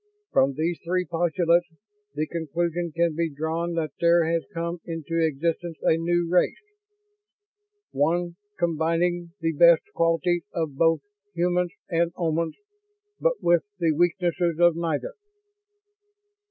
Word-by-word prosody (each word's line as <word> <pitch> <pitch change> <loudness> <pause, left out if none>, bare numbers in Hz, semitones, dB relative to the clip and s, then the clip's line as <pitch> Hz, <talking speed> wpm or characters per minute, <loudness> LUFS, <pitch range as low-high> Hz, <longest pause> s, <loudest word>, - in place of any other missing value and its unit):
From 135 +1 +3
these 165 +3 -1
three 180 +1 0
postulates 170 0 +1 0.5
the 155 +1 0
conclusion 170 +1 -2
can 170 +1 +1
be 165 0 0
drawn 160 +3 -3
that 160 -2 -1
there 170 0 +4
has 165 0 0
come 170 -1 -3
into 165 0 -2
existence 165 +2 -1
a - - +4
new 170 +1 0
race. 180 +1 +2 1.3
One 170 +4 0 0.2
combining 170 +1 0
the 165 0 +1
best 170 +2 +6
qualities 170 +1 +1
of 160 -4 -2
both 165 0 +3 0.3
humans 175 0 0
and 170 0 +1
Omans, 165 -1 -1 0.6
but - - 0
with 170 -1 +4 0.2
the 165 -3 +2
weaknesses 175 +1 +1
of 175 -1 +5
neither." 170 - -2
170 Hz, 125 wpm, -25 LUFS, 165-175 Hz, 1.3 s, best